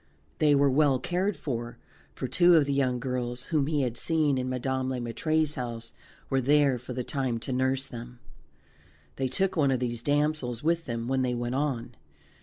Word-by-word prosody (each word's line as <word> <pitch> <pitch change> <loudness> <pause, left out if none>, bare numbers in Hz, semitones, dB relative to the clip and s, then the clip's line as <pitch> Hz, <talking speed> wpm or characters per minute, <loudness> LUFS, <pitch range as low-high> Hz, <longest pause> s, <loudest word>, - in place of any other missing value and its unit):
They 150 -2 +5
were 140 0 +4
well 140 0 +3
cared 185 +8 -1
for, 120 -4 -4 0.4
for 130 - -3
two 175 +7 +5
of 155 -3 +5
the 140 - -1
young 130 -3 +1
girls 125 -1 -2
whom 150 -4 0
he 150 -3 +1
had 120 -2 -2
seen 150 -4 +2
in 130 0 -2
Madame 130 +1 -1
Le 130 - -2
Maître's 155 +6 0
house 120 -3 -5 0.3
were 135 -1 +1
there 140 -1 +3
for 125 +1 -7
the 125 0 -3
time 130 -2 -2
to 115 - -5
nurse 130 +1 +1
them. 120 -1 -9 1.0
They 130 - 0
took 190 +9 0
one 145 -5 +3
of 130 -2 +1
these 120 -2 -2
damsels 145 -3 0
with 165 +1 +1
them 115 -1 -4
when 130 0 +1
they 125 -1 0
went 120 0 -3
on. 130 -4 -2
130 Hz, 195 wpm, -28 LUFS, 125-150 Hz, 1.0 s, They